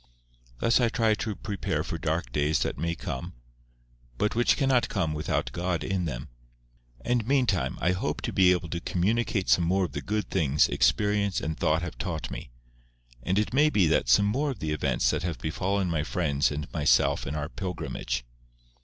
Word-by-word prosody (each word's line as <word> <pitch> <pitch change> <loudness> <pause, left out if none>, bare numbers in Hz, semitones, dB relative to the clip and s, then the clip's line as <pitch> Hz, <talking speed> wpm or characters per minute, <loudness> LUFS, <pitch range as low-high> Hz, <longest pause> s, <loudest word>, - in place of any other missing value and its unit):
Thus 115 - +3
I 120 -2 +3
try 115 -1 +2
to 110 -1 -3
prepare 100 0 -3
for - - -5
dark 80 -5 -2
days 75 +3 +1
that - - -3
may 85 +2 -1
come, 65 -7 -6 0.8
but 105 - 0
which 120 +1 +3
cannot 135 -4 +2
come 80 -1 -1
without 75 -5 -2
God 85 +3 -2
in 95 -2 -1
them. - - -5 0.7
And 120 -2 0
meantime 125 - +1
I 90 - +2
hope 90 - -2
to - - -3
be 95 -1 +5
able 90 -1 0
to 85 - -3
communicate 95 +3 0
some 85 - +4
more 95 +3 +2
of - - -7
the - - -4
good 105 -2 -3
things 75 -6 +3
experience 100 +11 +2
and 80 +1 -3
thought 80 +2 +1
have 90 - -6
taught 85 -5 -3
me, - - -7 0.7
and 90 +10 -1
it 105 +3 0
may 150 +3 +5
be 90 - +3
some 65 +12 +5
more 135 +9 0
of 130 - -4
the 80 -5 -3
events 75 - +1
that - - -1
have 85 -1 -3
befallen 95 +4 -1
my 80 -3 0
friends 75 -3 0
and 75 0 -4
myself 75 -2 +2
in 70 - -3
our 75 0 -2
pilgrimage. 80 -10 -4
90 Hz, 190 wpm, -27 LUFS, 75-105 Hz, 0.8 s, be